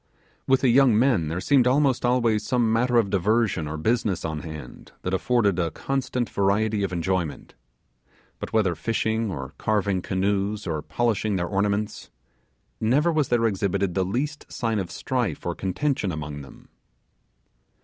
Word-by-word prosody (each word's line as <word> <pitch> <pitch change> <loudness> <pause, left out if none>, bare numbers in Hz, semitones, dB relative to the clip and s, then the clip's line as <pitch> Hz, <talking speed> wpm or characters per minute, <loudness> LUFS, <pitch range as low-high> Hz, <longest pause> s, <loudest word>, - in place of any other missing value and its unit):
With 130 -1 +4
the 130 - +3
young 125 -2 +5
men 115 - +3
there 85 +3 -2
seemed 130 +4 +3
almost 135 0 +2
always 120 -3 +2
some 120 -3 +1
matter 120 +1 +2
of 105 -5 +2
diversion 100 -3 +1
or 75 +1 -4
business 110 +1 0
on 80 -1 -3
hand 80 -1 -9
that 90 - -2
afforded 100 -2 +2
a 85 -2 +1
constant 125 - -2
variety 100 +2 +1
of 100 - -1
enjoyment. 90 -2 -2 0.9
But - - -6
whether 105 -5 +2
fishing, 110 +2 -1
or 65 -5 -6
carving 100 -3 0
canoes, 100 +3 -1
or 80 -4 -2
polishing 110 -1 0
their 90 -2 0
ornaments, 100 +2 -1 0.7
never 145 +10 +2
was 155 -4 +1
there 120 -1 +2
exhibited 100 -3 0
the 95 - +1
least 135 +11 -3
sign 115 -3 -1
of 95 -3 -4
strife 115 - -2
or 85 - -1
contention 95 +4 -1
among 75 -2 -5
them. 70 - -14
105 Hz, 155 wpm, -25 LUFS, 90-120 Hz, 0.9 s, young